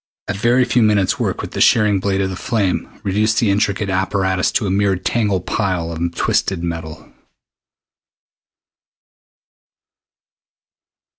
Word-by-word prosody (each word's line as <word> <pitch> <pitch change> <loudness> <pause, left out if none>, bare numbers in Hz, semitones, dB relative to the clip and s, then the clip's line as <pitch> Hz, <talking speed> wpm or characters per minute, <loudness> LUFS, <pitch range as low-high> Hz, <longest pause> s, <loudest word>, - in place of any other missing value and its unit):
A - - -1
very 120 +5 +2
few 120 0 +1
minutes' 105 -4 +2
work - - -1
with - - -7
the - - -3
shearing 105 -3 +4
blade 95 0 -1
of 95 -1 -3
flame 100 -6 -1
reduced 105 +3 +1
the 110 -5 +2
intricate 100 0 0
apparatus 95 -1 0
to 110 - 0
a 95 - -1
mere 100 0 +2
tangled 100 -1 -1
pile 90 -6 -1
of 85 +1 -3
twisted 95 -3 0
metal. 80 -2 -6
100 Hz, 125 wpm, -18 LUFS, 95-105 Hz, -, shearing